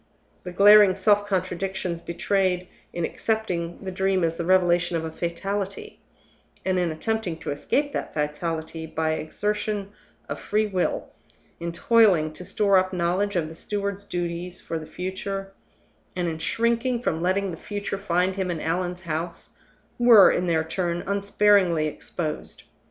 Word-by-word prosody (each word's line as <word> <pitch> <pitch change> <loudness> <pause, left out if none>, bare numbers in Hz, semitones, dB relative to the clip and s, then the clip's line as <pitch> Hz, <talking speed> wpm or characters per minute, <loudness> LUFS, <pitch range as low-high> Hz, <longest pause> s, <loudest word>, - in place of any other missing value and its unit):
The 180 - -5
glaring 200 +1 +7
self 205 +1 +3
contradictions 185 -2 -2
betrayed 180 +1 0 0.2
in 170 -1 -2
accepting 185 -5 -2
the 190 - -3
Dream 190 0 +1
as 165 0 +1
the 170 - -4
revelation 175 -1 +3
of 160 - -3
a 160 - -5
fatality, 195 +4 -4 0.6
and 185 -1 +1
in 175 -1 +1
attempting 185 +1 -2
to - - -5
escape 285 - -1
that - - -3
fatality 160 +2 -3
by 160 0 -1
an 155 - -1
exertion 205 +4 -2 0.4
of - - -5
free 215 +1 +1
will 190 -4 -1 0.5
in 170 0 -3
toiling 180 -5 +4
to 180 - -9
store 200 +1 +3
up 185 0 -1
knowledge 185 +3 0
of 165 -3 0
the 160 - -9
steward's 200 +3 -3
duties 175 -1 -4
for 165 - -4
the 155 - -9
future, 195 +1 -5 0.6
and 180 -1 -1
in 160 -1 -3
shrinking 235 +5 0
from 160 -6 -1
letting 190 +2 +1
the - - -5
future 200 +2 -5
find 185 0 0
him 190 -2 -1
in 170 -2 -2
Allan's 180 +3 -2
house 165 +1 -4 0.5
were, 235 -5 +8
in 180 - 0
their 160 -2 +2
turn, 170 +1 -2
unsparingly 200 -4 +3
exposed. 155 +1 -5
185 Hz, 155 wpm, -25 LUFS, 170-200 Hz, 0.6 s, were